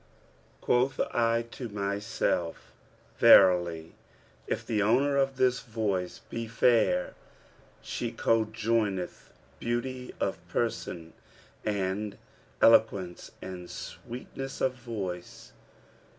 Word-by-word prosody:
Quoth 130 +2 +2
I 115 0 +2
to 120 -3 -6
myself, 100 -4 -2 0.5
'Verily, 85 -4 +6 0.5
if - - -2
the 110 -2 0
owner 130 +7 +3
of 135 -1 +1
this 125 -1 +3
voice 105 -6 -2
be 115 0 -4
fair, 120 - +2 0.7
she 120 -1 -3
conjoineth 110 -4 0 0.3
beauty 125 +2 -3
of - - -1
person 80 -1 -3 0.5
and 100 0 -2 0.5
eloquence 100 -6 +4
and 90 -2 -7
sweetness 135 +2 -7
of 130 - +1
voice.' 105 -8 -6
110 Hz, 90 wpm, -29 LUFS, 95-120 Hz, 0.7 s, Verily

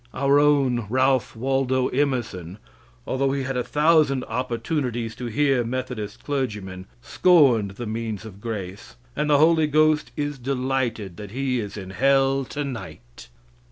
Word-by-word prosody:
Our 140 +1 +3
own 135 -6 +2
Ralph 130 0 +1
Waldo 130 +1 0
Emerson, 120 - -2 0.5
although 135 +1 0
he 140 -1 -1
had 135 0 -3
a 125 - 0
thousand 150 -3 +3
opportunities 120 -1 -3
to 125 - -5
hear 135 +1 +2
Methodist 120 -4 -5
clergymen, 105 -10 -4 0.2
scorned 135 - +4
the 120 - -5
means 110 -1 -4
of 100 -2 -11
grace, 105 -2 -6 0.2
and 150 +1 -1
the 145 - +5
Holy 160 +1 +4
Ghost 155 0 +2
is 145 -2 -3
delighted 125 -7 -2
that 105 -1 -8
he 130 +2 -1
is 105 -1 -6
in 95 -2 -7
hell 135 +4 +2
tonight. 115 - -7
130 Hz, 140 wpm, -24 LUFS, 110-140 Hz, 0.5 s, the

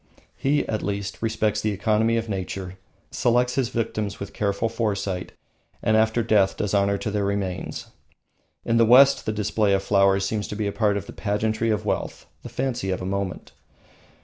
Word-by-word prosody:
He, 145 +2 0
at 110 - -2
least, 100 -1 -4
respects 110 -2 0
the 110 - 0
economy 110 +3 +1
of 115 0 -2
nature, 95 -2 -4 0.4
selects 125 +1 +2
his 130 -4 0
victims 105 -3 -3
with 100 - -7
careful 100 +2 0
foresight, 105 -5 -2 0.5
and 110 - +3
after 110 +1 +2
death 105 -4 +3
does 105 -1 -2
honour 100 0 +2
to 105 +1 -3
their 105 0 0
remains. 100 -2 -3 0.8
In 115 - +2
the 115 - +6
West 135 +4 +6
the - - +2
display 105 -1 +1
of 95 0 +1
flowers 100 -1 +3
seems 105 0 -2
to - - -6
be 105 0 -2
a 100 - -1
part 105 -1 +1
of 100 - -5
the - - -10
pageantry 110 +2 -1
of 105 -1 0
wealth, - - -3 0.2
the - - -8
fancy 125 -7 -2
of 95 -1 -2
a - - -4
moment. 95 -1 -3
105 Hz, 185 wpm, -24 LUFS, 100-110 Hz, 0.8 s, the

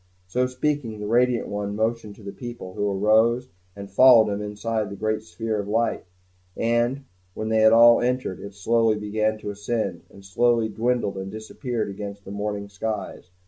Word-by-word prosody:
So 125 +8 0
speaking, 125 -4 -2
the 105 - -5
radiant 120 +2 +2
one 100 0 -3
motioned 110 -1 -2
to 110 - -16
the 100 - -6
people, 120 -7 -8
who 105 +1 -1
arose, 110 +5 +2 0.3
and 100 0 -8
followed 110 +1 +6
him 100 - -4
inside 105 +1 -3
the 100 - -7
great 110 +1 -1
sphere 110 +3 -4
of 100 - -4
light; 115 0 0 0.5
and 120 +4 +1 0.3
when 110 0 -3
they 110 0 +2
had 110 0 +6
all 115 +1 +7
entered, 125 -6 -1
it 100 0 -9
slowly 115 +2 +2
began 110 +1 -1
to 105 -1 -5
ascend, 100 -3 -3
and 100 0 -16
slowly 115 +3 +2
dwindled 115 -2 -1
and 95 0 -5
disappeared 110 +1 -4
against 100 0 -8
the 95 - -8
morning 100 0 -3
skies. 100 -2 -5
110 Hz, 180 wpm, -24 LUFS, 100-115 Hz, 0.5 s, all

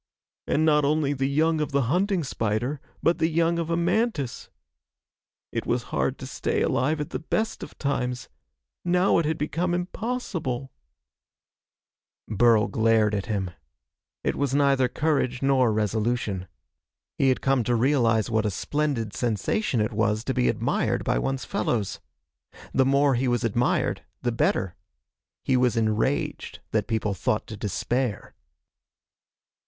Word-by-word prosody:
And 155 - +2
not 150 -1 +4
only 145 0 +1
the 135 0 -1
young 155 +2 +2
of 150 -1 -3
the 140 -1 +3
hunting 180 - +1
spider, 120 +3 -2 0.2
but 170 - +3
the 160 - +2
young 170 +1 +1
of 165 -1 -2
a 165 - +1
mantis... 170 - -1 1.0
It - - -3
was - - 0
hard - - 0
to - - -8
stay - - -1
alive 150 +5 +1
at 150 - -4
the - - -3
best 220 +7 -2
of - - -9
times. 125 -3 -2 0.6
Now 180 +1 +3
it 165 - 0
had 160 +1 0
become 170 +4 -1
impossible 175 - -3 0.8
..." - - -69
Burl 110 0 +4
glared 110 -2 +2
at 100 0 -2
him. 100 -5 -2 0.7
It - - 0
was 140 -1 0
neither 140 -2 +3
courage 135 -2 0
nor 130 -4 +3
resolution. 105 -2 -1 0.7
He 135 - +4
had 130 - +1
come 135 -3 +2
to 120 - +2
realize 115 -3 +2
what 110 -2 +1
a - - +1
splendid 125 +1 -2
sensation 120 - 0
it 110 +2 0
was 105 0 +1
to 130 - -1
be 125 -1 +2
admired - - 0
by - - +1
one's 130 - -2
fellows. 110 -3 -1 0.7
The 130 - +4
more 140 0 +4
he 130 +1 0
was 120 0 +1
admired, 120 +2 +1 0.2
the 120 - +1
better. 130 - 0 0.7
He 130 - +2
was 125 -2 +2
enraged 110 +5 -1
that 105 -2 0
people 110 -3 -1
thought 100 +3 -1
to 110 - -8
despair. 105 +3 -2
130 Hz, 150 wpm, -25 LUFS, 115-150 Hz, 1.0 s, not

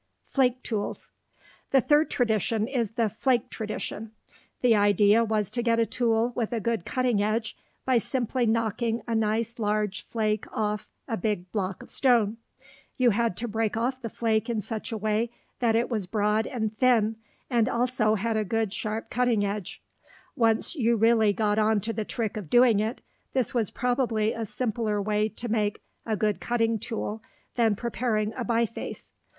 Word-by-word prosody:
FLAKE 255 -2 +1
TOOLS 215 -3 -4 0.6
The 270 - +5
third 295 +5 +3
tradition 220 -2 +1
is 235 -5 -1
the 230 -1 +1
flake 240 +4 0
tradition. 215 0 -5 0.5
The 245 -3 +5
idea 205 +2 +4
was 215 -3 0
to 240 - -1
get 230 -1 +2
a 230 - +4
tool 230 +1 +1
with 230 -3 -1
a 230 - 0
good 225 -4 -1
cutting 250 -5 +1
edge 215 +2 -1 0.3
by 255 -2 +4
simply 245 0 -1
knocking 230 +1 0
a 230 - -1
nice 225 +2 0
large 210 -4 0
flake 215 -2 -1
off 210 -1 -2 0.2
a 225 -4 -2
big 185 -2 -2
block 190 -3 -3
of - - -11
stone. 230 -5 +3 0.6
You 250 -2 +4
had 225 -3 0
to 240 - -3
break 220 0 -1
off 255 +3 -1
the 230 - -4
flake 220 +1 0
in 230 -2 0
such 220 +3 -4
a 225 - -2
way 215 +2 0 0.3
that 230 -2 +2
it 235 +1 +2
was 215 -7 -2
broad 210 +2 +1
and 220 -3 -3
thin, 225 -3 +3 0.3
and 235 -2 +2
also 235 -3 +1
had 220 +2 -1
a 215 - +1
good 220 0 -1
sharp 220 0 -3
cutting 235 -4 +2
edge. 200 -2 -5 0.5
Once 225 -4 +2
you 235 -5 +2
really 225 -1 +4
got 210 +1 +1
on 215 0 +3
to 225 +3 -3
the 220 -1 -3
trick 220 -1 -3
of 195 -8 -6
doing 240 -1 +5
it, 220 +4 -2 0.3
this 260 -3 0
was 225 -6 +1
probably 240 -3 0
a 225 -1 -4
simpler 220 -2 -1
way 210 +1 +1
to 235 +2 -6
make 215 -2 -1 0.2
a 220 -1 0
good 210 -1 0
cutting 230 -2 0
tool 220 0 -4 0.3
than 225 -3 +2
preparing 225 -1 -1
a 250 - -4
biface. 230 -1 -2
225 Hz, 175 wpm, -27 LUFS, 215-235 Hz, 0.6 s, The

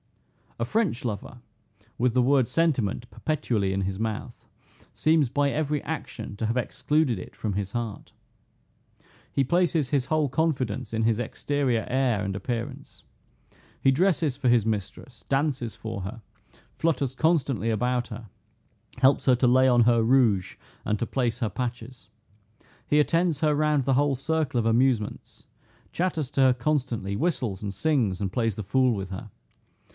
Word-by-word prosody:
A 115 - -1
French 175 - 0
lover, 120 +2 -5 0.6
with 125 0 +1
the 125 0 +3
word 130 -1 +3
sentiment 125 - 0
perpetually 115 -11 -1
in 95 0 -1
his 95 0 -3
mouth, 110 -1 -4 0.5
seems 155 -4 +2
by 140 +2 +1
every 150 -1 -1
action 130 -9 -6
to 110 - -2
have 115 +3 -1
excluded 140 0 0
it 90 - -9
from 105 -3 -3
his 100 0 -3
heart. 115 -3 -5 1.2
He 135 - +1
places 165 -2 +1
his 135 -2 +1
whole 155 0 +1
confidence 135 -8 -1
in 110 0 0
his 110 -1 +2
exterior 125 -1 -1
air 125 -5 +1
and 95 -1 -3
appearance. 120 +7 -5 0.8
He 135 - +4
dresses 155 -3 +1
for 130 -3 +1
his 120 -3 +4
mistress, 110 +2 -4
dances 135 -4 0
for 110 -3 -6
her, 105 +6 -7 0.5
flutters 140 -5 0
constantly 135 - +1
about 125 +2 0
her, 115 -1 -8 0.7
helps 135 +2 +4
her 130 - +5
to 125 +1 +2
lay 130 +2 +5
on 120 -2 +5
her 115 -1 +4
rouge, 115 -6 +2 0.3
and 105 - 0
to 120 - -2
place 125 -2 -1
her 115 -4 0
patches. 120 -1 -6 0.8
He 150 - +3
attends 165 0 +2
her 155 -2 +2
round 150 -2 +1
the 135 - +2
whole 145 0 +2
circle 150 -1 -1
of 115 - -1
amusements, 115 -2 0 0.5
chatters 165 -6 -1
to 135 - +1
her 130 -1 +6
constantly, 120 -7 -1
whistles 125 - -1
and 100 -1 -3
sings, 105 - +1
and 95 -2 -2
plays 115 -4 0
the 110 - -5
fool 125 +5 +2
with 95 -3 -4
her. 95 +4 -7
125 Hz, 160 wpm, -26 LUFS, 110-145 Hz, 1.2 s, her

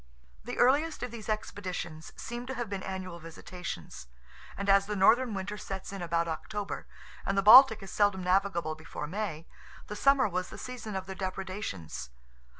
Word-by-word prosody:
The - - -6
earliest 290 +6 +3
of 250 - -4
these 225 -3 -8
expeditions 185 -6 -4
seem 240 +1 -6
to 265 - -4
have 240 -4 -4
been 195 -1 -3
annual 185 -2 -5
visitations; 165 - -8 0.5
and 200 - -3
as 195 0 +5
the 210 - -2
northern 225 +4 +4
winter 205 +2 -4
sets 195 0 -6
in 195 - -5
about 170 -1 0
October, 200 +5 -4 0.4
and 195 - -1
the 195 - +3
Baltic 220 0 +9
is 195 - -9
seldom 205 -3 +2
navigable 180 -3 +1
before 155 -1 -7
May, 170 -2 -4 0.4
the 210 - -6
summer 275 +1 +4
was 185 -1 -2
the - - -9
season 235 -5 -6
of 190 -1 -3
their 190 - -6
depredations. 185 - -5
195 Hz, 170 wpm, -30 LUFS, 180-215 Hz, 0.5 s, Baltic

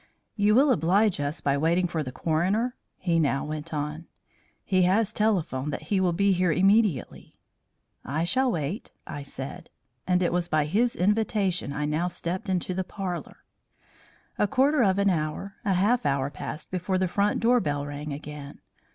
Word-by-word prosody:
"You 210 0 +3
will 275 +3 +5
oblige 190 - +2
us 145 +1 -2
by 140 0 +1
waiting 170 +4 +2
for 170 -2 -2
the 130 -4 -5
coroner?" 190 - 0 0.2
he 170 -2 +1
now 140 -3 +1
went 155 +2 -5
on. 150 +2 -4 0.6
"He 185 -2 +2
has 200 +4 +2
telephoned 170 -11 0
that - - -6
he 190 - +3
will 180 -2 +2
be 200 +4 +2
here 180 -1 +2
immediately." 195 - +1 0.7
"I 150 +5 -2
shall 255 +9 +2
wait," 165 - -3 0.2
I 145 - -6
said. 135 -1 -8 0.4
And 180 0 +2
it 175 - +1
was 175 -1 0
by 155 -2 +1
his 225 +10 +1
invitation 200 -4 +1
I 150 +1 -2
now 155 +4 0
stepped 180 +1 -4
into 185 0 -1
the 190 +1 -1
parlour. 185 -2 -6 1.0
A 210 - +3
quarter 275 +4 +3
of 195 -4 +3
an 200 -1 +3
hour, 160 +4 -3
a 200 - +1
half 210 +7 +2
hour, 140 -1 0
passed 155 - -7
before 185 +1 -1
the 185 0 +1
front 200 +4 +1
door 245 +2 +4
bell 145 -7 -2
rang 145 +1 -6
again. 145 0 -8
180 Hz, 175 wpm, -26 LUFS, 150-200 Hz, 1.0 s, will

